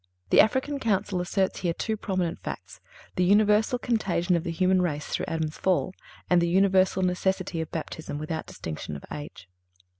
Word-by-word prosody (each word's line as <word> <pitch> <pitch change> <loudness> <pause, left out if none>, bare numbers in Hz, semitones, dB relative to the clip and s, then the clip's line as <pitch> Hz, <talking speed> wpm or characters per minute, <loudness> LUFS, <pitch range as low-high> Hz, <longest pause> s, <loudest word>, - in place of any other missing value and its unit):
(343) - - +5
The - - +11
African 260 +5 -1
Council 200 -5 0
asserts 190 +2 0
here 170 -2 -1
two 220 - -1
prominent 185 -5 -2
facts—the - - -6
universal 210 +5 +4
contagion 195 -8 0
of 170 - 0
the 175 - -4
human 185 +2 +2
race 150 -4 -1
through - - -3
Adam's 160 -1 -3
fall, 185 0 +1 0.3
and 180 -1 +4
the 170 - +1
universal 190 0 +3
necessity 185 -1 0
of 160 - -5
Baptism 160 -2 -5
without 155 +1 -4
distinction 75 -1 -6
of 70 - -9
age. 145 -11 -8
185 Hz, 170 wpm, -27 LUFS, 165-200 Hz, 0.3 s, The